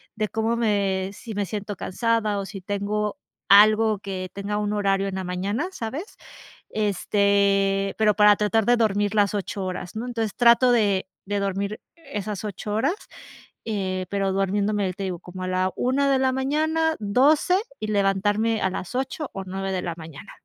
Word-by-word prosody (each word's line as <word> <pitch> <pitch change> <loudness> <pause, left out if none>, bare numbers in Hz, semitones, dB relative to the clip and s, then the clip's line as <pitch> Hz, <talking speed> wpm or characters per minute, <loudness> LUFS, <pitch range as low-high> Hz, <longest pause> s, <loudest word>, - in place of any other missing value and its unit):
de 215 -1 -1
cómo 225 +1 0
me 200 -4 0
si 220 +2 -9
me 205 0 -1
siento 205 0 -5
cansada, 215 +2 0
o 195 - -4
si 195 0 -8
tengo 205 +2 -2 0.3
algo 215 +1 +6
que 185 -2 -5
tenga 200 +1 -3
un 210 0 -1
horario 195 -1 +1
en 190 - -5
la 190 -1 -3
mañana, 195 - -2
¿sabes?, 285 - -6 0.6
este, 200 -1 +1
pero 215 -1 +3
para 210 0 +6
tratar 210 +1 +1
de 245 - +5
dormir 205 -2 +1
las 205 -1 +2
8 200 -1 -3
horas, 180 -1 -5
¿no?, 220 +2 -4
entonces 225 -4 -3
trato 240 +1 +5
de 200 -5 +2 0.2
de 205 +1 -1
dormir 200 +2 -2 0.2
esas 215 - -5
8 210 0 -4
horas, 225 +10 +2 0.7
eh, 190 -4 -2
pero 195 -1 0
durmiéndome 200 0 0
te 195 - -6
digo 185 -3 -3
como 185 +2 -8
a - - -3
la 185 0 0
1 275 +3 +1
de 270 - +4
la 260 0 +2
mañana, 315 +4 +1
12, 275 - +3 0.2
y 215 - -4
levantarme 205 +2 +1
a 190 - +2
las 185 +4 -6
8 270 +3 -3
o 195 - -5
9 190 +1 -4
de 185 - -1
la 170 -2 -4
mañana. 160 -3 -10
205 Hz, 175 wpm, -24 LUFS, 195-225 Hz, 0.7 s, algo